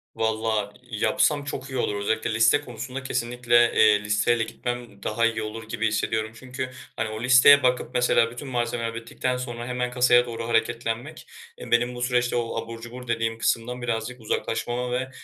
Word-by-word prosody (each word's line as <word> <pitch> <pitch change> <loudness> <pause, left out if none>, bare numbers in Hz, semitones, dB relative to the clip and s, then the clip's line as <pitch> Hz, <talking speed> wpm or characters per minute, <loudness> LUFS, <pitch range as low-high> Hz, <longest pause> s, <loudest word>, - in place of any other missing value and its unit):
Valla 110 -2 -1 0.2
yapsam 120 +7 +1
çok 140 -2 -5
iyi 130 - -4
olur. 105 -4 0
Özellikle 110 +2 -1
liste 115 +5 +4
konusunda 130 +1 -7
kesinlikle, 120 -1 +2
eee, 105 -1 +5
listeyle 110 +3 +2
gitmem 120 -2 -6
daha 115 +2 +1
iyi 115 -1 0
olur 110 +1 -7
gibi 115 0 0
hissediyorum. 110 +1 -1
Çünkü, 130 +1 -6 0.3
hani, 110 0 -2
o 110 +1 -6
listeye 130 +3 +7
bakıp, 125 0 +1
mesela, 125 -1 +3
bütün 120 +4 -8
malzemeler 120 -2 -2
bittikten 125 +2 -3
sonra 120 -1 -5
hemen 125 0 -2
kasaya 125 -1 +4
doğru 115 -1 -5
hareketlenmek, 115 +5 -2 0.3
eee, - - -10
benim 120 +1 +2
bu 120 - -7
süreçte 125 0 +1
o 115 -1 -1
abur 115 0 -9
cubur 125 +2 -9
dediğim 115 -1 -1
kısımdan 120 +2 -1
birazcık 120 +1 -3
uzaklaşmama 120 +2 -2
ve, 130 +1 -2
120 Hz, 170 wpm, -25 LUFS, 115-125 Hz, 0.3 s, listeye